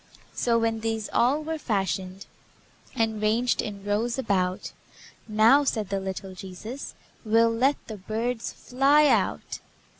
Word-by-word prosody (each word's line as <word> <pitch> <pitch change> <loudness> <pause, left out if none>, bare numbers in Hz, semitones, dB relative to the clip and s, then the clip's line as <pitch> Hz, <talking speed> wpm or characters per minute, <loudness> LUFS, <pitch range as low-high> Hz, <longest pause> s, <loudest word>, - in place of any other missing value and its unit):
So, 235 -1 +1
when 225 -1 0
these 225 -1 -3
all 275 +6 +2
were 320 0 -4
fashioned, 195 -4 -2 0.7
And 220 -2 0
ranged 225 +4 +2
in 200 -2 -7
rows 225 +4 0
about, 190 -7 -1 0.6
"Now," 225 +6 +5
said 215 -7 -1
the 195 -1 -1
little 190 0 -5
Jesus, 195 +8 -8 0.3
"We'll 230 +1 +3
let 265 +5 +3
the 220 - -7
birds 225 +4 -3
fly 275 +4 +3
out." - - +1
225 Hz, 130 wpm, -26 LUFS, 200-245 Hz, 0.7 s, Now